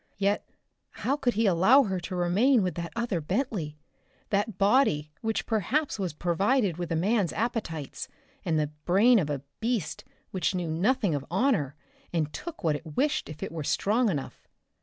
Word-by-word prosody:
Yet.... 200 +1 0 0.6
How 275 - +3
could 260 -6 0
he 225 +2 +2
allow 195 +9 +6
her 190 -5 -2
to 180 +2 -5
remain 200 +8 +3
with 180 - -1
that 170 0 -5
other 230 -7 -1
Bentley 180 - -2 0.5
that 205 0 0
body 195 - +3
which 225 0 -1
perhaps 225 - 0
was 185 -3 -1
provided 180 - +1
with 175 -2 -4
a - - +1
man's 195 0 +1
appetites, 210 - -3 0.4
and 160 -2 +1
the 150 -1 -1
brain 215 +6 +5
of 155 -5 -1
a 140 -2 -3 0.2
beast 225 -7 -2 0.3
which 185 -1 0
knew 175 -3 -2
nothing 200 +3 +1
of 140 -2 -2
honor 180 - +1 0.4
and 155 -3 -1
took 340 -2 -7
what 155 -3 +2
it 150 0 -8
wished 295 - +1
if 155 - -7
it - - -4
were 160 -2 -4
strong 220 - +2
enough? 145 -7 -5
190 Hz, 175 wpm, -28 LUFS, 165-230 Hz, 0.6 s, allow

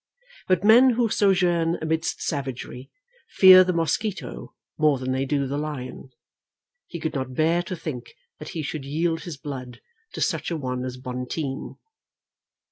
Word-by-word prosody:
But 185 -1 +2
men 235 +5 +7
who 235 -1 +1
sojourn 175 -5 +2
amidst 160 0 -2
savagery 130 -3 -5 0.4
fear 185 -1 +8
the 185 - 0
mosquito 165 - -3 0.2
more 150 -2 +4
than 130 0 -3
they 130 +1 0
do 140 0 0
the 140 +2 -3
lion. 145 -4 -6 0.8
He 170 - -7
could 160 0 -3
not 130 -3 -4
bear 165 +4 +2
to 180 +1 -5
think 125 -8 -7 0.2
that 155 - -8
he 155 - -2
should 150 0 -5
yield 160 +4 -1
his 170 -5 -6
blood 130 -4 -7 0.3
to - - -6
such - - -1
a 170 - -2
one 125 -3 -3
as 130 0 -5
Bonteen. 130 +2 -5
155 Hz, 155 wpm, -24 LUFS, 130-175 Hz, 0.8 s, fear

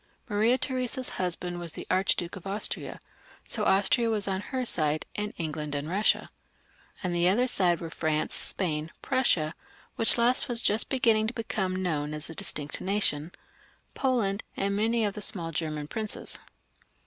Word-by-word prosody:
Maria 225 +3 +3
Theresa's 255 -1 0
husband 175 0 -2
was 170 -2 -1
the - - -6
Archduke 185 -1 +1
of 195 0 -9
Austria, 200 +2 -1 0.4
so - - 0
Austria 205 +4 +3
was 210 -2 0
on 190 0 -1
her 255 +3 -3
side, 155 -7 +4
and 210 0 -2
England 150 -3 -3
and 145 +1 -2
Sussia. 200 +4 +2 0.7
On 180 -1 -1
the 175 +1 +3
other 235 +7 +3
side 180 -9 +2
were 165 -1 -6
France, 155 -2 -1
Spain, 155 -4 -2
Prussia 170 -12 +2 0.2
— - - -28
which 225 - +5
waa 235 +1 +5
just 230 -4 +1
beginning 225 -5 +3
to 230 - -3
become 190 -5 -2
known 150 -4 -1
aa 150 - -6
a 165 - -7
distinct 150 -2 -2
nation 180 -5 +1 0.3
— - - -32
Poland, 225 -7 +1 0.2
and 200 0 0
many 225 +2 +2
of 205 - -1
the 210 - -6
small 170 -4 -2
German 155 -2 -3
princes. 215 +5 -2
195 Hz, 165 wpm, -28 LUFS, 165-220 Hz, 0.7 s, which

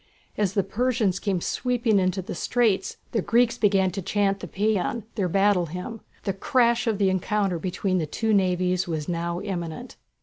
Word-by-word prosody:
As 200 -3 0
the 200 - +2
Persians 220 -5 0
came 190 -4 -1
sweeping 240 -3 +1
into 185 0 0
the - - -6
straits 215 +3 0
the 225 - +1
Greeks 240 +3 +2
began 195 -3 +3
to 195 - -4
chant 200 +1 0
the 180 - -7
Pæan, 210 +3 0
their 195 -5 -1
battle 195 -1 +3
hymn. 180 +7 -6 0.2
The 195 - -1
crash 235 +3 +2
of 220 -3 +1
the 195 -2 +2
encounter 190 -1 0
between 185 +2 -1
the 155 - -2
two 220 +8 0
navies 185 -1 +1
was 155 -3 -3
now 170 0 -2
imminent. 170 -4 -5
195 Hz, 175 wpm, -25 LUFS, 180-220 Hz, 0.2 s, began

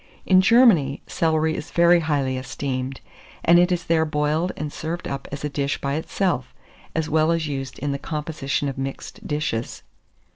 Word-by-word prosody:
In 185 -1 +6
Germany, 190 - +4
celery 160 -1 +1
is 150 - -6
very 170 0 +5
highly 145 -5 0
esteemed; 130 0 -4 0.4
and 170 +1 +7
it 180 +1 +3
is 175 -1 0
there 160 -1 +2
boiled 155 +3 0
and 150 0 -4
served 165 +2 -4
up 140 0 -5
as 140 +1 -6
a - - 0
dish 140 0 -2
by 140 0 -2
itself, 160 - -1 0.4
as 160 -1 0
well 155 +1 +2
as 165 -2 0
used 135 -3 -5
in 145 0 -2
the 140 - -3
composition 150 -2 -3
of 135 -1 -4
mixed 135 0 -6
dishes. 150 -6 -3
150 Hz, 175 wpm, -23 LUFS, 140-165 Hz, 0.4 s, and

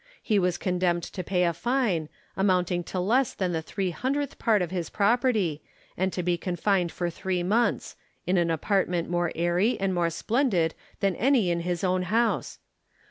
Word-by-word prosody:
He 215 -4 +2
was 180 -2 +1
condemned 180 -2 0
to 185 - -6
pay 180 0 +1
a 170 -1 +2
fine, 190 - 0 0.3
amounting 180 -2 +1
to 185 - -4
less 235 +8 +1
than 185 -2 -1
the 165 -2 -1
three 185 +3 -3
hundredth 275 - -2
part 215 -5 +3
of 175 - -5
his 175 -3 -3
property, 210 - +1 0.3
and 190 +1 0
to 180 - -3
be 175 0 0
confined 180 -1 0
for 175 -1 -2
three 180 +1 -2
months 220 +6 0 0.2
— - - -43
in 185 - +1
an 170 -1 +2
apart 190 +5 +1
ment 175 -1 -2
more 175 -1 0
airy 175 +7 +1
and 195 -1 0
more 175 -1 +1
splendid 195 - +1 0.3
than 195 -2 +1
any 240 -8 +3
in 170 - 0
his 175 +1 -2
own 185 0 +1
house. 225 +6 0
180 Hz, 190 wpm, -26 LUFS, 175-210 Hz, 0.3 s, part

